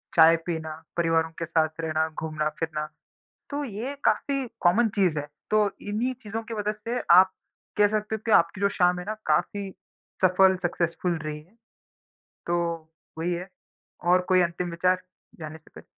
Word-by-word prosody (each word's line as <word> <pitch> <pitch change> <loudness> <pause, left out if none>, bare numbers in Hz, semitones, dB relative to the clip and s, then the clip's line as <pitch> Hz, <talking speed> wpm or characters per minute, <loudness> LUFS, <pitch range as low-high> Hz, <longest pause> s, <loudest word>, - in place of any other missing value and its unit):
चाय 160 +1 +8
पीना, 160 -2 -3 0.2
परिवारों 165 -1 +2
के - - 0
साथ 160 0 0
रहना, 160 0 0
घूमना-फिरना, 155 0 -3 0.6
तो 290 -1 -2
ये 240 +4 -5
काफ़ी 275 -2 +1
कॉमन 220 +6 +4
चीज़ 180 -6 +3
है। 145 - -6 0.2
तो 215 -1 +4
इन्हीं 220 +5 -1
चीज़ों 220 +1 -4
के - - -2
वजह 210 -1 -1
से 230 +3 -4 0.2
आप 185 +1 +6 0.4
कह 210 0 +6
सकते 215 +1 -1
हो 220 - -7
कि 225 - 0
आपकी 170 +3 0
जो 200 - +4
शाम 180 0 +4
है 180 - -7
ना, 215 - -2
काफ़ी 195 +6 0 0.6
सफल 190 +1 +5
सक्सेसफुल 170 0 -1
रही 150 -1 -5
है। 180 +8 -25 0.9
तो 175 0 +1 0.6
वही 170 +2 -1
है 175 +2 -4 0.6
और 180 +1 +6
कोई 185 -1 +5
अंतिम 175 +1 -2
विचार 185 +2 +1 0.4
जाने 155 0 -7
से 160 - -23
पहले? - - -11
180 Hz, 165 wpm, -26 LUFS, 160-210 Hz, 0.9 s, चाय